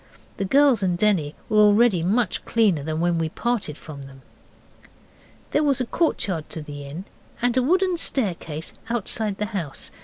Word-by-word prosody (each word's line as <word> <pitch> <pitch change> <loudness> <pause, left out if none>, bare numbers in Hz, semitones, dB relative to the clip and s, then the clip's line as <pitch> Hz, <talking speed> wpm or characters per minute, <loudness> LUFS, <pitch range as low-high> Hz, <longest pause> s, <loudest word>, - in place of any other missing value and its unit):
The 195 - -1
girls 270 0 +4
and 180 -2 0
Denny 180 -7 +1
were 215 - +2
already 210 -2 +5
much 210 +7 +1
cleaner 210 -10 +2
than 155 +2 -3
when 170 -1 +1
we 160 -1 -1
parted 215 -6 -2
from 145 -3 -10
them. 135 -1 -13 1.3
There 295 - +2
was 280 -4 +2
a 255 - 0
courtyard 190 - -1
to 160 - -5
the 145 -1 -8
inn 155 +7 -7 0.3
and 245 0 +1
a 255 - +4
wooden 365 +6 +2
staircase 170 - -1 0.2
outside 220 -3 -1
the 210 - -1
house. 165 -9 -3
195 Hz, 165 wpm, -23 LUFS, 160-240 Hz, 1.3 s, already